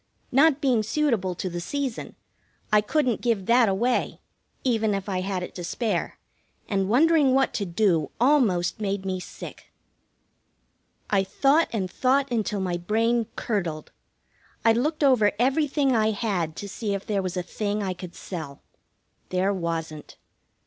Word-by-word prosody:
Not 285 +2 +4
being 255 -5 +3
suitable 220 -6 0
to 185 - -4
the 175 -1 -4
season, 270 +5 -4 0.6
I 210 - +6
couldn't 250 +1 0
give 225 -6 0
that 235 0 +4
away, 235 +6 0 0.4
even 225 -5 +1
if 195 0 -4
I 185 -2 -1
had 185 -1 -2
it - - -7
to 180 - -7
spare, 205 +1 -2 0.5
and 195 -2 0
wondering 290 +1 +4
what 270 0 +2
to 200 - -2
do 170 -5 +1
almost 230 -10 +2
made 200 -1 -2
me 185 -1 -2
sick. - - -10 1.4
I 195 -2 +3
thought 275 +11 +2
and 200 -5 -1
thought 265 +7 +1
until 215 -3 -1
my 180 -2 -1
brain 225 +5 +1
curdled. 170 -8 -3 0.7
I 225 - +6
looked 300 +7 0
over 245 -7 +4
everything 275 +1 +2
I 220 -1 +3
had 195 -7 -2
to 200 - -6
see 200 +1 -3
if 195 - -6
there 205 -2 0
was 185 -1 -4
a 180 - -1
thing 205 +2 -2
I 190 -2 -1
could 180 -1 -10
sell. 155 -7 -7 0.7
There 185 +2 +1
wasn't. 165 -4 -4
210 Hz, 155 wpm, -25 LUFS, 185-250 Hz, 1.4 s, I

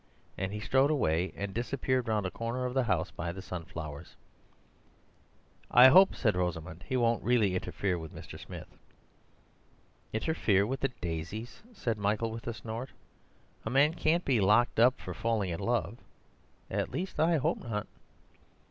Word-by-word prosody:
And 95 0 -3
he 105 - -4
strode 135 +6 +3
away 90 - +1
and 100 -1 -4
disappeared 130 +1 -1
round 105 -3 0
a 90 - -2
corner 115 +5 -3
of 125 - -2
the 130 -1 +2
house 90 -5 0
by 85 - -4
the 95 - -8
sunflowers. 80 -5 -7 1.5
"I 125 +2 +9
hope," 190 +7 +7
said 105 -6 +1
Rosamund, 90 0 -3
"he 130 - 0
won't 115 -1 +2
really 115 -6 +3
interfere 90 0 -1
with 80 -1 -8
Mr. - - -10
Smith." - - -9 1.4
"Interfere 110 -6 +1
with 130 +4 -3
the 135 - 0
daisies!" 90 +8 -5
said 115 - -3
Michael 105 +3 0
with 115 +1 -7
a 120 - -1
snort. 115 +4 -6 0.7
"A - - -3
man 140 +5 +4
can't 170 +1 +1
be 125 -6 +2
locked 105 +5 +3
up 125 +2 +5
for - - -6
falling 110 -5 -1
in 85 - -4
love—at 120 -1 -4
least 185 -2 -4
I 165 +1 +4
hope 155 +4 0
not." 105 -3 -3
115 Hz, 155 wpm, -30 LUFS, 95-130 Hz, 1.5 s, I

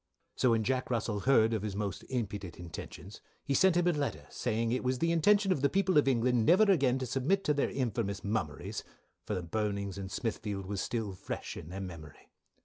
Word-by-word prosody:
"So 125 - +3
when 115 -1 +3
Jack 130 +3 0
Russell 115 -3 -1
heard 115 -1 +4
of 110 - 0
his 105 -2 -4
most 100 -1 -3
impudent 105 -8 -3
intentions, 90 +3 -9 0.2
he 140 - 0
sent 185 +4 +4
him 175 - +3
a 175 - +4
Letter 145 -3 -2
saying 115 -1 -1
it 125 - 0
was 130 0 +1
the 165 +5 +1
intention 195 +4 +4
of 150 - +1
the 140 - +3
people 190 -1 +1
of 145 - +1
England 125 -2 +3
never 180 - +6
again 140 -11 +3
to 130 - -3
submit 135 +10 +1
to 150 - +2
their 140 - +1
infamous 110 -6 -2
mumerys 100 -9 -3 0.5
for 105 - -1
the 90 - -3
burnings 100 +1 -2
in 95 -1 -5
Smithfield 105 -2 -3
was 100 0 -3
still 110 -5 -2
fresh 90 - -6
in 80 - -8
their 95 +2 -5
memory. 85 -6 -10
115 Hz, 210 wpm, -31 LUFS, 100-135 Hz, 0.5 s, never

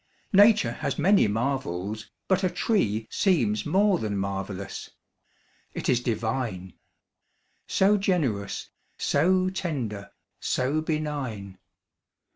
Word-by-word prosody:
Nature 205 +2 +6
has - - -3
many 200 - +4
marvels; 110 -3 -2 0.2
but 190 0 +2
a 185 - +3
tree 145 - 0
Seems 120 - +1
more 195 +2 +3
than 105 -2 -2
marvellous. 100 0 -4 0.9
It - - -3
is 125 - +4
divine. 110 -5 -2 0.9
So 200 +2 +3
generous, 145 - -1 0.3
so 185 +5 +2
tender, 120 - -4 0.3
so 135 +5 0
benign. 140 - -3
130 Hz, 95 wpm, -26 LUFS, -, 0.9 s, Nature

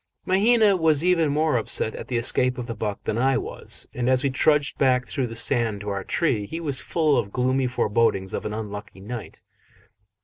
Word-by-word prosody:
Mahina 210 +2 +4
was 160 -3 +3
even 170 -4 +3
more 150 -1 +1
upset 110 0 -1
at - - -8
the 125 - -1
escape 125 +2 +1
of 125 - -4
the 115 - -5
buck 105 -2 -4
than 110 - -2
I 135 +2 +3
was, - - -4
and 125 0 -1
as 130 0 +3
we 140 - +1
trudged 145 +2 +2
back 125 -2 +3
through 135 -4 -2
the 115 - -8
sand 115 -3 0
to 105 - -5
our 100 -1 -3
tree, 110 - 0
he 165 - -5
was 145 -5 -1
full 155 -5 +1
of 100 -4 -4
gloomy 130 +2 +1
forebodings 105 -5 0
of - - -3
an 105 - -4
unlucky 105 -2 -7
night. 105 -2 -8
125 Hz, 205 wpm, -24 LUFS, 110-150 Hz, -, Mahina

